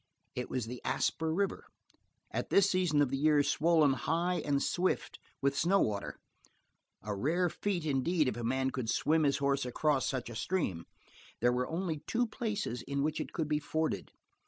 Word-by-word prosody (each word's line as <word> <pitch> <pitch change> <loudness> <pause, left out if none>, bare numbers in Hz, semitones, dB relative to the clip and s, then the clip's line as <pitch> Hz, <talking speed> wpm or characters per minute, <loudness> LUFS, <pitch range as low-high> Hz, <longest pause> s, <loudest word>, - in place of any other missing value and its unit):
It 125 - -4
was 125 -3 -2
the 120 +2 -7
Asper 160 0 0
river, 195 +4 -1 0.6
at - - -3
this 200 0 +5
season 180 -6 +3
of 135 - -1
the 135 - 0
year 150 0 +4
swollen 155 -2 +3
high 170 +7 0
and 145 -2 +1
swift 185 +1 -1 0.2
with 140 0 +2
snow 185 +7 +3
water 100 - -1 0.9
a 105 -1 -3
rare 165 - +1
feat 185 -6 -2
indeed 150 +2 +1
if 125 - -1
a 120 - -5
man 130 +3 0
could 125 -4 -3
swim 160 +6 +2
his 140 0 +2
horse 140 0 +1
across 135 +2 +1
such 130 -2 -2
a - - -8
stream. 110 - -1 0.5
There 120 +1 +3
were 125 0 0
only 165 -2 -2
two 240 +1 +1
places 215 - -3
in 140 0 -2
which 155 +1 -1
it - - -6
could 160 -4 -2
be 150 0 +1
forded. 155 +1 -2
150 Hz, 180 wpm, -32 LUFS, 130-170 Hz, 0.9 s, this